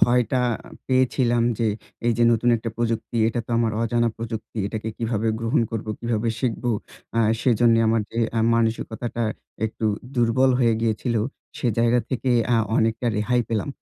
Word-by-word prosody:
ভয়টা 125 +1 +3 0.5
পেয়েছিলাম 130 -2 +2 0.2
যে, 115 - +1 0.4
এইযে 120 0 +2
নতুন 115 +2 +1
একটা 115 0 -5
প্রযুক্তি। 115 0 -2
এটা 120 +1 -1
তো - - -10
আমার 115 -2 +1
অজানা 120 0 +1
প্রযুক্তি। 115 0 -6
এটাকে 110 +1 -4
কিভাবে 115 -1 -1
গ্রহণ 115 +3 +1
করবো, 110 -1 -4
কিভাবে 115 -1 -1
শিখবো? 120 -1 -1 0.5
আ - - +3 0.2
সেজন্য 120 -1 +4
আমার 115 0 +3
যে, 115 - -4 0.2
আ - - +2 0.2
মানসিকতাটা 115 +1 -1 0.4
একটু 110 0 -6 0.3
দুর্বল 120 +2 +3
হয়ে 115 -3 +3
গিয়েছিল, 115 +1 0 0.4
সে - - -1
জায়গা 120 +1 +3
থেকে 130 0 -1 0.2
আ - - +4 0.2
অনেকটা 115 +2 +1
রেহাই 115 +4 +1
পেলাম। 110 0 -1
115 Hz, 150 wpm, -23 LUFS, 115-120 Hz, 0.5 s, সেজন্য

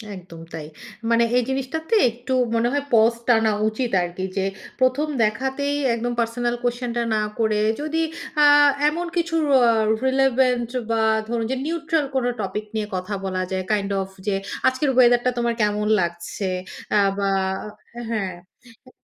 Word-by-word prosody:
একদম 175 -3 -11
তাই। 160 -2 -6 0.5
মানে 230 0 +4
এই 250 - +3
জিনিসটাতে 275 - -2
একটু 245 +3 -5 0.2
মনে 230 +1 +2
হয় 285 -1 0
পস 225 +1 +5
টানা 225 -3 +4 0.2
উচিত 230 +3 -2
আরকি 175 +1 -4
যে, 195 - +1 0.3
১ম 260 +4 +2 0.2
দেখাতেই 265 +6 -1 0.2
একদম 240 +1 -2
পার্সোনাল 240 +1 0
কুয়েসশন 245 0 -2
টা 235 - +1
না 215 - +1 0.2
করে, 215 -2 +2 0.2
যদি 310 +2 -2 0.4
আ - - +8 0.4
এমন 340 +3 -3
কিছু 335 -1 0
র - - +2 0.5
রিলেভেন্ট 260 -2 +2 0.2
বা 225 -1 +1 0.3
ধরুন 230 0 -1
যে - - 0
নিউট্রাল 325 -1 0
কোন 260 -2 +1 0.2
টপিক 210 +2 -4
নিয়ে 215 -1 -1
কথা 185 +3 -4
বলা 185 -1 -2
যায়। 190 0 -1
কাইন্ড 200 -1 0
অফ 190 - -5 0.2
যে, 200 - +1 0.3
আজকের 260 +3 +1
ওয়েদারটা 245 0 +5
তোমার 235 0 +1
কেমন 210 0 +1
লাগছে? 175 +3 -3 0.4
অ্যা 210 - +4 0.2
বা 200 -1 0 0.8
হ্যাঁ। 200 -5 -2 0.5
এ - - -13
235 Hz, 155 wpm, -22 LUFS, 210-265 Hz, 0.8 s, আ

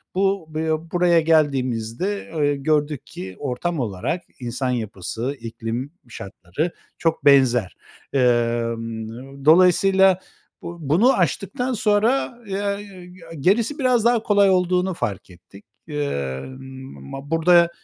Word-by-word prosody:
Bu 195 -2 +1
bı 160 0 -1
buraya 175 -1 +4
geldiğimizde, 145 - 0
eee, 145 -2 +1
gördük 150 0 0
ki 95 +1 -8
ortam 145 +5 -2
olarak 115 - -2 0.2
insan 125 +1 -3
yapısı, 115 +2 -3
iklim 115 +3 -5 0.2
şartları 100 - -5 0.3
çok 160 -3 -1
benzer. 130 -7 +4 0.4
Emm, 120 +1 -1
dolayısıyla 185 +3 +5 0.4
bu 170 - -7
bunu 220 - +5
aştıktan 245 - -1
sonra, 230 +4 +1
eee, 200 -2 -4 0.3
gerisi 225 - +1
biraz 250 -4 +2
daha 235 -2 +3
kolay 205 -2 +4
olduğunu 180 0 +2
fark 105 - -4
ettik. 90 +3 -16 0.2
Emm, 130 - -4 0.5
ma 135 - -7
ba 145 - -14
burada 170 +1 +5
150 Hz, 110 wpm, -22 LUFS, 120-190 Hz, 0.5 s, dolayısıyla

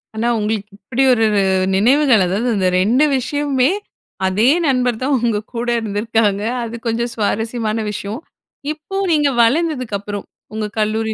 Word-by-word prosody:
ஆனா, 225 +2 -1
உங்களுக்கு 210 0 -2
இப்படி 240 +6 -1
ஒரு 225 -2 +2 0.5
நினைவுகள். 245 0 +4
அதாவது, 210 +7 -1
இந்த 185 -1 +2
2 250 +9 +3
விஷயமுமே 275 +2 0 0.6
அதே 210 +7 +3 0.2
நண்பர் 250 -4 +1
தான் 275 +2 +1
உங்க 230 -3 +1 0.2
கூட 235 +1 -3
இருந்திருக்காங்க. 210 -1 0 0.2
அது 230 0 -6
கொஞ்சம் 235 +1 -1
சுவாரஸ்யமான 225 +1 -1
விஷயம். 210 +6 -5 0.5
இப்போ 310 +5 -8 0.2
நீங்க 295 -2 +3
வளர்ந்ததுக்கு 255 -3 +1
அப்புறம் 205 0 -6 0.3
உங்க 215 0 -2
கல்லூரி 220 +1 0
230 Hz, 135 wpm, -18 LUFS, 210-255 Hz, 0.6 s, நினைவுகள்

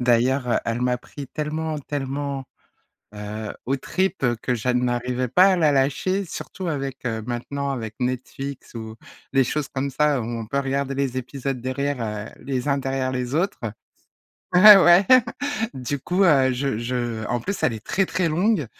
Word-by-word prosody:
D'ailleurs, 125 +2 +2
heu, 120 - +3
elle 115 +1 -2
m'a 125 0 +1
pris 140 +3 -10
tellement, 155 0 -3
tellement, 140 -1 -4 0.7
heu, 105 +1 -6
aux 135 +2 +1
tripes 185 +2 -1 0.2
que 125 - 0
je 125 +2 0
n'arrivais 125 0 0
pas 185 +10 +5
à - - +2
la 160 -4 +4
lâcher, 145 +8 +1
surtout 185 +2 -7
avec, 135 -5 -3
heu, 110 -2 -2
maintenant, 140 +4 -3
avec 115 -5 -4
Netflix 130 +2 -4
ou 110 -1 -7 0.4
les 135 -1 +4
choses 145 +3 -2
comme 140 +1 -3
ça, 145 0 +2
où - - -3
on 115 -1 -4
peut 140 - -1
regarder 135 0 -1
les 135 -2 -1
épisodes 135 0 -4
derrière 135 +2 -2
heu, 105 -1 -6
les 130 -1 -2
uns 140 -1 +2
derrière 135 -1 -1
les 125 +2 -2
autres. 190 +5 0 0.9
Ouais, 205 +3 +10
ouais, 180 0 +6 0.7
du 135 +1 -3
coup, 180 +8 +1
heu, 135 -7 +5
je 135 0 -1
je 120 -1 -3
en 120 - -1
plus, 200 - -3
elle 125 - +3
est 110 -1 -8
très, 195 - +1
très 185 -2 0
longue 180 - +1
135 Hz, 175 wpm, -23 LUFS, 125-145 Hz, 0.9 s, Ouais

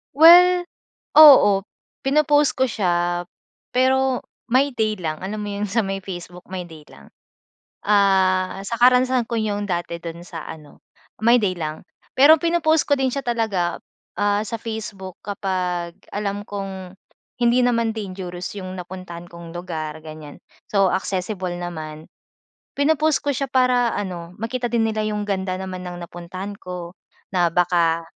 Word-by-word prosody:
Well, 355 +3 +8 0.5
oo. 265 -10 +9 0.4
Pino-post 295 +1 +3
ko 260 - +2
siya, 175 -3 0 0.5
pero 260 0 +2 0.3
My 260 +4 +3
Day 220 -3 0
lang. 160 -5 -4
Alam 210 +3 -5
mo - - -5
yung 200 +1 -3
sa 225 +3 +1
may 195 0 -3
Facebook, 180 -2 -9
My 185 -1 -5
Day 160 -3 -14
lang. 70 - -17 0.8
Ah, 190 -2 +3
sa 235 - -2
karanasan 250 0 +4
ko 230 - 0
yung 205 -2 -2
dati 170 -1 -2
dun 170 +1 -8
sa 165 -3 -7
ano, 150 -2 -12 0.4
My 235 +2 +6
Day 200 -5 0
lang. 155 -1 -6 0.3
Pero 305 +4 +8
pino-post 330 -2 +2
ko 285 -1 +2
din 265 -1 +1
siya 275 - -3
talaga, 220 -8 -1 0.4
ah, 205 0 +2
sa 225 +2 -5
Facebook 210 -5 -7
kapag 180 -4 -3 0.2
alam 205 0 -3
kong 195 -3 -7 0.5
hindi 240 +1 +4
naman 230 -2 +2
dangerous 185 -4 -6
yung 185 -1 -6
napuntahan 175 -1 -8
kong 170 -1 -10
lugar, 160 -3 -5
ganyan. 155 -2 -10 0.3
So 195 -2 +3
accessible 185 -1 -2
naman. 160 -3 -7 0.7
Pino-post 310 +1 +3
ko 285 - +1
siya 275 0 -3
para 250 -2 +2
ano, 180 -3 -6
makita 240 +2 -3
din 230 -2 +2
nila 215 -1 -1
yung 210 -1 -2
ganda 190 -2 -2
naman 185 -1 -6
ng 175 0 -6
napuntahan 185 +4 -7
ko, 180 -2 -7 0.4
na 175 -1 +3
baka 170 -1 +2
195 Hz, 145 wpm, -22 LUFS, 175-235 Hz, 0.8 s, oo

